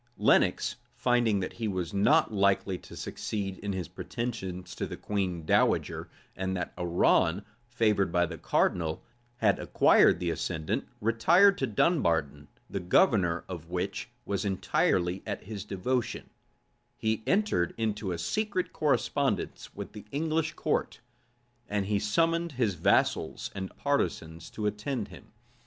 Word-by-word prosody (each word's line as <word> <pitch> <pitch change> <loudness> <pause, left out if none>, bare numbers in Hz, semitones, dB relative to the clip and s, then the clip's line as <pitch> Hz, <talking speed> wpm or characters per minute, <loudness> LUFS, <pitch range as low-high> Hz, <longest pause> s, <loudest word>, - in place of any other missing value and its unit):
Lenox, - - +3 0.2
finding 120 -5 +2
that 95 - -4
he 115 -2 -3
was 95 -4 -3
not 125 +7 +3
likely 100 -1 +2
to - - -12
succeed 100 -3 -4
in 100 - -3
his 95 -2 -3
pretensions 95 -7 -5
to - - -3
the - - -7
queen 95 -5 -2
dowager, - - +1 0.3
and 95 0 -2
that 90 - -4
Arran, 90 +1 +2 0.2
favored 105 -6 +1
by 90 0 +3
the 85 -1 -7
cardinal, 80 -3 0 0.3
had 105 -5 +2
acquired - - +4
the 85 -1 -1
ascendant, 80 -1 -2
retired 165 - +5
to 135 - 0
Dunbarton, 80 - +1 0.2
the 100 - -3
governor 90 - +3
of 85 -3 -7
which 95 +6 -3 0.2
was 100 -2 -1
entirely 95 -2 +1
at 105 - -4
his 100 -1 -6
devotion; 120 +5 -2 0.7
he 110 0 0
entered 195 - +1
into 105 -3 -1
a 85 - -2
secret 200 - -1
correspondence 140 -2 0
with - - -7
the 105 -1 -10
English 160 +2 0
court; 155 - -1 0.7
and 105 -1 0
he 100 0 +1
summoned 165 +10 +1
his 120 -6 +1
vassals - - +1
and 95 -1 -6
partisans 85 - -1
to 105 - -5
attend 105 +3 -2
him. - - -14
100 Hz, 140 wpm, -29 LUFS, 90-120 Hz, 0.7 s, retired